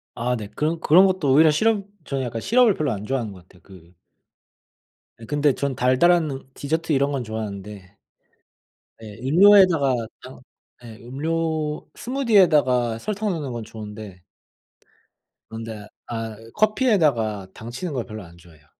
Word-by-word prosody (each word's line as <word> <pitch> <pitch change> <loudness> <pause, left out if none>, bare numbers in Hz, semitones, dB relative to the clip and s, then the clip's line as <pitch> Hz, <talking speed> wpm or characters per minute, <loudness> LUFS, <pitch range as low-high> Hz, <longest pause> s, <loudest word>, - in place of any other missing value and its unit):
아 125 +1 -1
네. 105 -3 -6
그런 160 +2 -1
그런 180 +5 +6
것도 185 -8 +1
오히려 155 +3 +6
시럽 205 +5 +1 0.2
전 135 -3 -3
약간 115 -2 -4
시럽을 235 - +4
별로 150 -5 -1
안 105 0 -5
좋아하는 120 -5 -2
것 90 -2 -13
같아요 90 -3 -22
그 90 -3 -17 1.3
예. 115 - -11
근데 145 +2 +1
저는 140 0 -3
달달한 150 +6 +3
음 135 0 -8
디저트 160 +3 -2
이런 140 +1 +1
건 135 -3 -2
좋아하는데, 105 -3 -7 1.0
예 110 -1 -10
음료에다가 170 -3 +5 0.3
당 130 +1 -11 0.4
예 110 -2 -11
음료 155 +4 -3
스무디에다가 160 - +2
설탕 210 - -3
넣는 150 -8 -3
건 120 -1 -5
좋은데 105 -4 -10 1.3
그런데 110 -2 -8 0.2
아 115 -2 -5
이 115 0 -15
커피에다가 155 - +1
당치는 125 +9 -6
걸 125 -3 -3
별로 110 -3 -8
안 85 0 -16
좋아해요. 80 -3 -20
130 Hz, 305 characters per minute, -23 LUFS, 110-165 Hz, 1.3 s, 그런